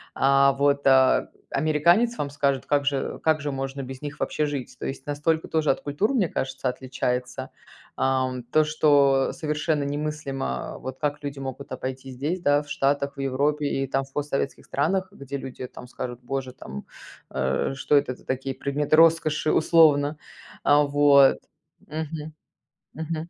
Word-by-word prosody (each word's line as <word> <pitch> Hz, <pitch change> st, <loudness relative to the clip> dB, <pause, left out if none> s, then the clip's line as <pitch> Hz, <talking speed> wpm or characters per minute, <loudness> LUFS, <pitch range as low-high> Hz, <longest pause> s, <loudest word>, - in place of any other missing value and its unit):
А 140 Hz, 0 st, +4 dB
вот, 140 Hz, +1 st, +1 dB
а, 130 Hz, -1 st, +5 dB, 0.2 s
американец 170 Hz, +11 st, +2 dB
вам 145 Hz, -, -2 dB
скажет: 140 Hz, -2 st, 0 dB
"Как 145 Hz, -1 st, +1 dB
же 140 Hz, -2 st, -1 dB
как 155 Hz, -1 st, +2 dB
же 145 Hz, 0 st, -2 dB
можно 135 Hz, 0 st, -4 dB
без 130 Hz, 0 st, -8 dB
них 150 Hz, 0 st, -7 dB
вообще 150 Hz, -, 0 dB
жить?" 140 Hz, -4 st, -5 dB
То -, -, -5 dB
есть 135 Hz, 0 st, -5 dB
настолько 155 Hz, +2 st, 0 dB
тоже 160 Hz, -2 st, +2 dB
от -, -, -3 dB
культур, 150 Hz, -, 0 dB
мне 215 Hz, -9 st, +2 dB
кажется, 130 Hz, 0 st, -2 dB
отличается. 125 Hz, -1 st, -3 dB, 0.5 s
Ам, 130 Hz, -1 st, 0 dB
то, 140 Hz, +6 st, +3 dB
что 145 Hz, -3 st, +3 dB
совершенно 150 Hz, -1 st, -1 dB
немыслимо, 140 Hz, -, -3 dB
вот, 130 Hz, 0 st, -7 dB
как 145 Hz, 0 st, -2 dB
люди 140 Hz, -1 st, -5 dB
могут 135 Hz, +1 st, -7 dB
обойти 130 Hz, +1 st, -5 dB
здесь, 150 Hz, +8 st, -3 dB
да, 145 Hz, -3 st, +3 dB
в 145 Hz, -, -15 dB
Штатах, 140 Hz, 0 st, 0 dB
в -, -, -9 dB
Европе 145 Hz, +3 st, 0 dB
и, 135 Hz, -1 st, -1 dB
там, 135 Hz, +1 st, 0 dB
в 135 Hz, 0 st, -16 dB
постсоветских 145 Hz, -1 st, -2 dB
странах, 185 Hz, +7 st, 0 dB
где 140 Hz, -6 st, -6 dB
люди, 130 Hz, -1 st, -7 dB
там, 125 Hz, -, -11 dB
скажут: 125 Hz, -1 st, -6 dB
"Боже, 130 Hz, 0 st, -4 dB
там, 70 Hz, -, -9 dB, 0.5 s
э, 65 Hz, -, 0 dB
что 145 Hz, -, +1 dB
это 140 Hz, -3 st, 0 dB
за -, -, -21 dB
такие 135 Hz, +1 st, -2 dB
предметы 140 Hz, +3 st, 0 dB
роскоши?" 160 Hz, -2 st, +4 dB
Условно, 155 Hz, -3 st, +4 dB, 0.5 s
а 145 Hz, +1 st, +5 dB
вот. 145 Hz, -1 st, +5 dB, 0.5 s
Мгм. 155 Hz, 0 st, -5 dB, 0.6 s
Мгм. 160 Hz, +1 st, -4 dB
140 Hz, 160 wpm, -25 LUFS, 135-150 Hz, 0.6 s, а